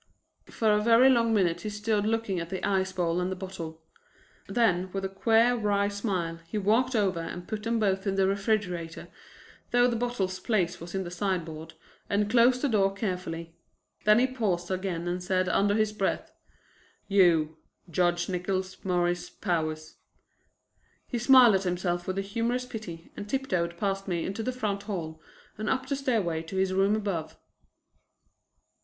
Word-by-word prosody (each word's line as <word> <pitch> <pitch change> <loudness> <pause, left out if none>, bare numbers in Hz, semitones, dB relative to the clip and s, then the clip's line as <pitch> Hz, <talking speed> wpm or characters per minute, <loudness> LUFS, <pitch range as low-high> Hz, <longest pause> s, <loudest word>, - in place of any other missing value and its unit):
For 220 -2 +1
a 210 - +2
very 235 +4 +6
long 230 -2 +3
minute 175 -5 +2
he 215 - -4
stood 210 0 0
looking 225 -4 0
at 170 0 -5
the 190 +2 -2
ice 190 -1 +1
bowl 175 -1 0
and 180 +1 -1
the - - -2
bottle; 165 -4 -7 0.6
then 185 -6 +1
with 195 0 -2
a - - -2
queer 225 +5 +3
wry 205 -3 +1
smile 185 -5 -2
he 190 - -4
walked 230 +6 +2
over 195 -5 +1
and 175 +2 -6
put 215 -2 -4
them 230 +2 0
both 195 -2 0
in 195 - 0
the 195 0 +3
refrigerator, 195 -5 -2 0.6
though 245 0 +4
the 240 - 0
bottle's 225 -6 -2
place 185 -4 0
was 170 +2 -7
in 190 - -1
the 175 - -7
sideboard, 165 -4 -3 0.3
and 205 +1 +1
closed 250 +2 +4
the - - +3
door 200 -5 +2
carefully. 180 -5 -4 0.5
Then 210 0 +6
he 245 - +4
paused 200 -9 -2
again 185 -2 -2
and 180 +1 -2
said 185 0 +1
under 200 +2 +2
his 215 -1 +1
breath, 195 -2 -2 0.8
"You, 165 -6 +3 0.3
Judge 175 +1 +1
Nickols 185 +1 -3
Morris 175 -1 0
Powers!" 155 -4 -3 1.1
He 240 - -3
smiled 250 -2 +7
at 190 0 +2
himself 175 -1 -1
with 185 0 -2
humorous 230 +5 -1
pity 185 -9 -8
and 205 - -7
tiptoed 185 -11 -1
past 195 0 -2
me 175 -3 -1
into 200 +4 -3
the 255 - -1
front 210 -6 -2
hall 165 -6 -5 0.4
and 215 - -2
up 260 0 0
the 280 +1 -1
stairway 220 -12 0
to 165 +4 -8
his 190 0 +1
rooms 195 +3 +3
above. 175 -7 -3
195 Hz, 170 wpm, -28 LUFS, 175-220 Hz, 1.1 s, smiled